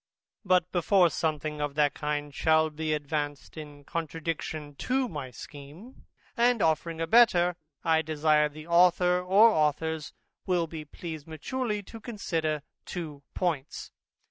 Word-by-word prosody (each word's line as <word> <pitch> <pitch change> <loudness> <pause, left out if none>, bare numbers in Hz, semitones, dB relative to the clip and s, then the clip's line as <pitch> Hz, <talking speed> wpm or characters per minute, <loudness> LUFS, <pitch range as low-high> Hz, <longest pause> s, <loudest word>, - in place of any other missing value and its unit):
But 180 -3 +2
before 180 -1 +3
something 155 -1 -2
of 145 -1 -2
that 150 -1 +3
kind 150 -1 -3
shall 160 +1 +3
be 155 +1 -3
advanced 145 -1 -3
in 145 -2 -10
contradiction 160 -1 -4
to 260 0 0
my 145 - -6
scheme, 145 - -12 0.3
and 240 0 +3
offering 160 -1 0
a 165 - 0
better, 180 -4 +5 0.3
I 160 -1 +3
desire 150 -1 +2
the 155 +1 -11
author 180 +1 +4
or 195 +5 +6
authors 155 -1 0 0.4
will 180 -2 +2
be 160 -1 -8
pleased 160 0 -8
maturely 210 - -3
to 225 +4 -11
consider 165 - -2 0.2
two 155 -6 -6
points. 160 -7 -2
160 Hz, 135 wpm, -28 LUFS, 150-180 Hz, 0.4 s, or